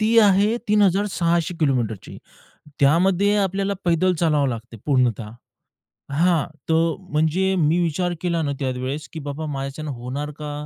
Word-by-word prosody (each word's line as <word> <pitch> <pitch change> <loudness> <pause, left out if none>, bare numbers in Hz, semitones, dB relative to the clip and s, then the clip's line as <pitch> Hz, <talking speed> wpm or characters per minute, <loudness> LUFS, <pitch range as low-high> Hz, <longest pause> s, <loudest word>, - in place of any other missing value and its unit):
ती 225 +2 +4
आहे 205 +1 +4
3,600 185 -4 +2
किलोमीटरची. 120 - -1 0.6
त्यामध्ये 185 +8 +3
आपल्याला 195 0 0
पैदल 180 +2 +2
चालवावं 150 -4 +1
लागते 115 -1 -6
पूर्णतः 125 -6 +1 0.8
हां 165 0 +2 0.2
तर 165 0 +2 0.2
म्हणजे 170 +5 +1
मी 160 +1 +2
विचार 175 +2 -1
केला 170 -2 0
ना 145 - -1
त्यावेळेस, 130 +2 -3
की 160 - -6
बाबा 145 +2 -5
माझ्याच्यान 140 +1 -5
होणार 130 +5 -5
का? 150 -1 -5
160 Hz, 130 wpm, -22 LUFS, 140-185 Hz, 0.8 s, ती